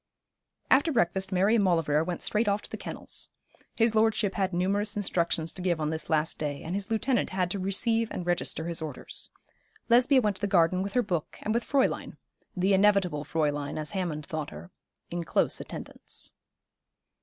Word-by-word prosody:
After 285 +5 +5
breakfast 190 - +1
Mary 190 +4 +3
and 225 -3 +4
Maulevrier 165 -5 +2
went 175 0 -3
straight 215 +1 +1
off 205 0 +1
to - - -11
the - - -3
kennels. - - -2 0.5
His 230 -1 +3
lordship 215 -2 +2
had 190 -1 0
numerous 200 +4 0
instructions 170 -5 0
to 185 - -6
give 175 -3 +1
on 155 0 -1
this 160 0 -4
last 160 0 +1
day, 145 -2 -3
and 165 - -4
his 200 +2 -2
lieutenant 230 +3 +1
had 185 -2 -1
to 200 - -2
receive 225 +4 +1
and 180 - -5
register 175 -2 -1
his 170 -1 0
orders. 150 -5 -6 0.6
Lesbia 250 +3 +6
went 210 -5 0
to - - -13
the 205 - +1
garden 180 -1 +3
with 200 +1 -3
her 250 - +3
book 175 -6 -3
and 215 - 0
with 235 +1 +1
Fräulein 275 -2 0 0.4
the 190 +2 +3
inevitable 190 -6 +3
Fräulein 145 -2 -1
as 155 -1 -3
Hammond 170 -7 -3
thought 155 -1 -4
her 80 +3 -11 0.4
in 175 0 -2
close - - +1
attendance. - - -5
185 Hz, 185 wpm, -28 LUFS, 165-210 Hz, 0.6 s, Lesbia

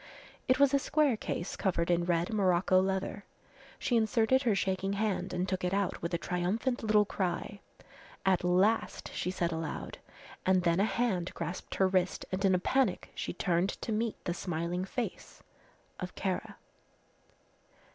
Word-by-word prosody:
It 255 - +3
was 280 -1 +5
a 280 - +5
square 295 -2 +2
case 190 -3 -4
covered 175 -3 0
in 170 0 +2
red 175 +4 0
morocco 185 -2 +3
leather. 190 +1 -2 0.5
She 245 - 0
inserted 225 +3 +3
her 235 -6 +2
shaking 195 0 0
hand 205 -1 -1
and 180 +1 -1
took 185 -1 -2
it 180 +2 +1
out 200 -2 -1
with 170 - -3
a - - +1
triumphant 185 +9 -1
little 215 -2 +4
cry. 190 +1 -3 0.7
"At 190 -2 +3
last," 185 +5 +1
she - - -2
said 175 -2 -1
aloud, 160 -2 -4 0.4
and 185 -1 +3
then 170 0 +2
a 200 - +4
hand 220 -7 0
grasped 175 - -5
her 190 - +3
wrist 185 -1 0
and 190 +1 -2
in 190 -1 +4
a - - +4
panic 250 +2 0
she - - -4
turned 175 +1 +1
to - - -3
meet 220 +1 0
the 175 - 0
smiling 175 +1 -2
face 240 +5 -5 0.6
of - - -6
Kara. - - -3
190 Hz, 165 wpm, -31 LUFS, 180-215 Hz, 0.7 s, was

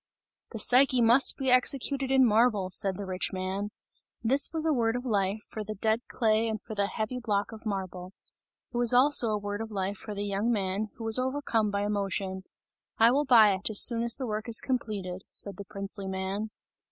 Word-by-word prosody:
"The 225 - -7
Psyche 255 +3 +4
must 235 +3 +3
be 265 -2 0
executed 270 +1 +1
in 265 -1 +4
marble!" 215 -4 +2
said 190 0 0
the 200 - -6
rich 185 -1 -2
man. 190 +2 -4 0.5
This 270 +5 +4
was 320 -1 0
a 315 - +2
word 230 -3 0
of 245 +1 -5
life, 205 -2 -1
for 215 - -6
the 215 +1 -6
dead 220 +3 0
clay 225 -1 +1
and 215 -1 -3
for 220 - -9
the 200 -1 -1
heavy 220 +5 -4
block 205 -4 -2
of 220 0 -9
marble; 185 -2 -5 0.6
it - - -3
was 240 0 +3
also 260 -1 +4
a 210 - 0
word 205 +1 -5
of 225 - -6
life 200 -1 -3
for 210 +1 -8
the 200 +1 -3
young 205 +4 -1
man 200 -1 -2
who 230 - -9
was 225 +2 +1
overcome 255 -5 -1
by 200 0 -2
emotion. 195 -2 -3 0.5
"I 225 +1 +5
will 285 +3 +1
buy 225 -6 +6
it, 190 +3 -4
as 215 - +6
soon 235 -1 +2
as 235 0 +4
the 265 - -5
work 215 0 -4
is 230 - +4
completed!" 205 -8 -3
said 200 -3 -3
the 200 - -8
princely 195 0 -6
man. 190 +3 -4
215 Hz, 210 wpm, -28 LUFS, 200-240 Hz, 0.6 s, buy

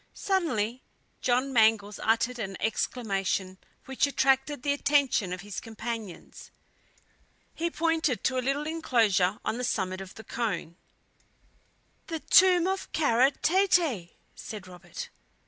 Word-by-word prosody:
Suddenly 260 - -1 0.4
John 255 +2 +1
Mangles 220 -3 +3
uttered 230 +2 +1
an 195 -3 -4
exclamation 195 -4 -1 0.3
which 265 +1 +1
attracted 270 0 +1
the 285 - +2
attention 280 -9 +1
of 180 0 -4
his 205 0 -6
companions. 225 -4 -7 1.0
He 340 +1 -2
pointed 320 - 0
to 260 -1 +1
a - - 0
little 275 +3 -1
inclosure 220 - +1
on 235 - -1
the - - -3
summit 190 -6 -1
of 190 -1 -10
the 220 - -10
cone. 200 -7 -3 1.3
"The 325 -2 -4
tomb 360 +1 +5
of 385 +1 -2
Kara 265 -4 +4
Tete!" 320 - +1 0.2
said 210 -4 -8
Robert. 180 -1 -9
240 Hz, 125 wpm, -28 LUFS, 200-290 Hz, 1.3 s, tomb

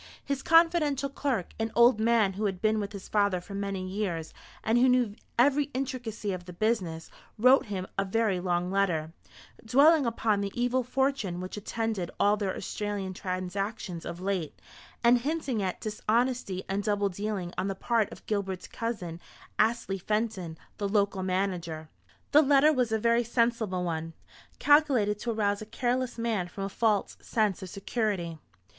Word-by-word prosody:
His 280 -1 -2
confidential 325 -4 +3
clerk 265 -8 -2
an 225 0 -1
old 235 -1 +6
man 220 -3 +3
who 210 +3 -2
had 190 -3 -1
been 215 +1 +2
with 205 -1 -3
his 200 -2 -8
father 200 -3 +2
for 180 +3 -11
many 195 -2 -3
years, 185 -5 -3 0.3
and 225 +2 +3
who 255 +1 +5
knew 250 -4 +2 0.2
every 285 +4 +4
intricacy 245 -6 -3
of 180 -1 -6
the 180 - -9
business 180 -5 -1 0.3
wrote 255 +3 +5
him 190 -3 -3
a - - +3
very 200 -1 +1
long 180 0 -1
letter, 170 -5 0 0.5
dwelling 280 +5 +5
upon 220 -3 +1
the 200 0 -2
evil 245 +1 +1
fortune 255 -7 -1
which 185 0 -6
attended 215 -3 -3
all 205 +1 +4
their 200 -3 -2
Australian 205 -2 -3
transactions 185 0 -4
of 170 - -6
late, 185 -4 -3 0.4
and 240 +1 +6
hinting 275 -4 -2
at 185 -2 -2
dishonesty 215 -2 -1
and 195 +1 -1
double 205 -1 +1
dealing 195 -2 -4
on 185 - -1
the 195 - -2
part 225 +1 0
of - - -12
Gilbert's 195 -3 -2
cousin, 185 -8 -4 0.4
Astley 215 -3 +1
Fenton, 210 -5 -2 0.2
the 200 -1 -1
local 200 -2 +1
manager. 180 -4 -2 0.4
The 300 - +7
letter 290 +1 +5
was 250 -5 +1
a 220 - +2
very 235 +2 +2
sensible 230 -5 0
one, 165 -1 -3 0.4
calculated 270 -9 +4
to 235 - -2
arouse 205 -2 0
a - - -6
careless 250 +2 -1
man 225 -6 -1
from 195 +2 -6
a 195 - -2
false 210 0 0
sense 215 -5 0
of 190 - -7
security. 195 -5 -2
210 Hz, 165 wpm, -28 LUFS, 190-235 Hz, 0.5 s, The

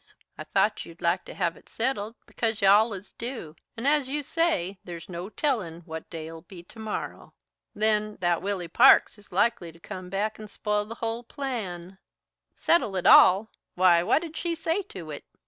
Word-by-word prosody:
I - - -8
thought - - +1
you'd - - -13
like - - +1
to - - -10
have - - 0
it - - -19
settled, 225 -4 -2
because 225 -2 -2
you 195 - +3
allus 205 -1 +3
do, 230 - -7 0.2
and, 235 +4 -2
as 290 -2 +3
you 295 +1 -2
say, 230 - 0
there's 170 -2 -8
no 180 +2 -6
tellin' 215 - -2
what 160 -1 -8
day'll 165 -1 -7
be 175 -1 -12
to 220 - -14
morrow. 220 -1 -6 0.4
Then, 215 0 +1
that 175 -2 +1
Willy 190 -2 -3
Parks 235 +3 +6
is 205 - -20
likely 190 -3 +1
to 165 - -19
come 185 +1 -8
back 210 +3 -2
and 215 -1 -9
spile 210 0 -1
the 230 - -7
hull 230 0 -3
plan." 200 -9 -5 0.6
"Settle 275 - +2
it 185 - -2
all? 200 +4 +7 0.2
Why, 180 -2 +5
what 245 - +2
did 325 -1 -8
she 340 0 -2
say 325 +4 -1
to 165 -5 -8
it?" 145 - -7
205 Hz, 185 wpm, -27 LUFS, 175-235 Hz, 0.6 s, all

